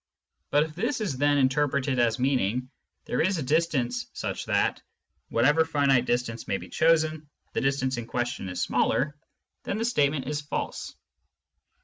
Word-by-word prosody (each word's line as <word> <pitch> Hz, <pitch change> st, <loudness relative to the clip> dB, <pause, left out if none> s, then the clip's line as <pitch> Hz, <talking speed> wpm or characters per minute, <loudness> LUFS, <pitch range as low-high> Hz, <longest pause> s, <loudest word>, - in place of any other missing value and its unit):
But 145 Hz, +1 st, +4 dB
if 155 Hz, -1 st, -7 dB
this 230 Hz, -, -1 dB
is 170 Hz, -12 st, -2 dB
then 145 Hz, 0 st, +3 dB
interpreted 135 Hz, -1 st, +1 dB
as 115 Hz, -2 st, +2 dB
mean 130 Hz, +1 st, +2 dB
ing 125 Hz, +7 st, -2 dB, 0.2 s
" -, -, -51 dB
there -, -, 0 dB
is 185 Hz, +3 st, +2 dB
a 155 Hz, -, -2 dB
distance 130 Hz, -5 st, 0 dB
such -, -, -4 dB
that, -, -, +1 dB, 0.5 s
whatever 150 Hz, +7 st, +4 dB
finite 140 Hz, -5 st, +2 dB
distance 120 Hz, -2 st, -2 dB
may 100 Hz, -, 0 dB
be -, -, -10 dB
chosen, 155 Hz, -2 st, +2 dB, 0.2 s
the -, -, 0 dB
distance 135 Hz, -1 st, 0 dB
in 115 Hz, -1 st, -5 dB
question 120 Hz, -5 st, -3 dB
is 90 Hz, -, -5 dB
smaller," 145 Hz, +2 st, +1 dB, 0.5 s
then 200 Hz, -, -3 dB
the 225 Hz, -, -1 dB
statement 145 Hz, -, +1 dB
is 150 Hz, +1 st, -2 dB
false. 145 Hz, -, -4 dB
140 Hz, 165 wpm, -27 LUFS, 125-155 Hz, 0.5 s, But